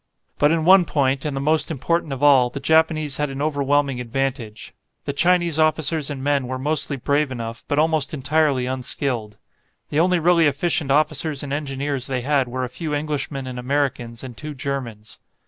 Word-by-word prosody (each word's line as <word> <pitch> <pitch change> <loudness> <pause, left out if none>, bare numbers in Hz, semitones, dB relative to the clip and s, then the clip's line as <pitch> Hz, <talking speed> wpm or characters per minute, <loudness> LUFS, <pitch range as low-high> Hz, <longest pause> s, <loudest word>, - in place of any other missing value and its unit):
But 145 - +5
in 165 -1 +1
one 185 0 +7
point, 135 -3 0
and 145 -2 -2
the - - -2
most 155 +2 +1
important 160 +1 -1
of 135 +1 -4
all, 135 -4 +6
the 130 - -6
Japanese 155 0 +2
had 150 -1 -1
an 135 0 -6
overwhelming 145 -2 +1
advantage. 125 -3 -4 0.3
The 140 - -3
Chinese 175 +1 +2
officers 155 -1 +1
and 135 -2 -5
men 140 -2 +1
were 130 +1 -3
mostly 145 +1 -1
brave 140 +2 0
enough, 115 -2 -6
but 145 - -1
almost 155 -2 +1
entirely 145 -2 +1
unskilled. 125 -4 -3 0.5
The 145 - 0
only 180 +2 +3
really 170 -1 +4
efficient 145 0 0
officers 150 0 0
and 140 -1 -4
engineers 140 -2 -3
they 130 -2 -2
had 135 0 +1
were 130 +1 -3
a - - -1
few 150 +5 -4
Englishmen 145 -2 -3
and 125 -1 -6
Americans 125 -3 -2
and 125 -2 -8
two 150 +6 -7
Germans. 125 -6 -5
140 Hz, 180 wpm, -22 LUFS, 130-155 Hz, 0.5 s, one